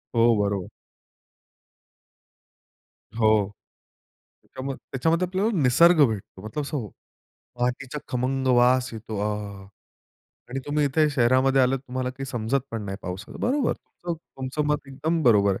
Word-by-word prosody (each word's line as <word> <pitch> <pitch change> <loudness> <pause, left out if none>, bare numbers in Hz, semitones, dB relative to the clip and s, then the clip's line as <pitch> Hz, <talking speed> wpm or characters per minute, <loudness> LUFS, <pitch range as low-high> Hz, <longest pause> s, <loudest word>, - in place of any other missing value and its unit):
हो, 115 0 +5
बरोबर. 100 -2 -1 2.5
हो. 110 -3 +3 1.0
त्याच्यामध्ये 135 +1 -6
त्याच्यामध्ये 165 +7 +1
आपल्याला 190 +4 0
निसर्ग 155 +5 +6
भेटतो 100 -3 -6
मतलब 130 +7 -3
सांगू, 140 -8 -4 0.7
मातीचा 125 +3 -1
खमंग 130 +2 -1
वास 125 +1 +3
येतो. 110 -1 -6
अहाहा! 105 -2 -4 0.8
आणि 135 - -3
तुम्ही 145 0 +1
इथे 150 +3 +3
शहरामध्ये 130 +1 +3
आलात 130 +1 +2
तुम्हाला 130 -1 -4
काही 135 +1 -7
समजत 125 +1 -1
पण 115 -1 -4
नाही 95 -1 -4
पावसाचं. 95 +4 -7
बरोबर, 260 +1 +1
तुमचं, 175 -1 -7 0.2
तुमचं 135 +3 -2
मत 150 -1 -1
एकदम 155 +5 -1
बरोबर 100 -5 +4
आहे. - - -7
130 Hz, 125 wpm, -25 LUFS, 110-145 Hz, 2.5 s, निसर्ग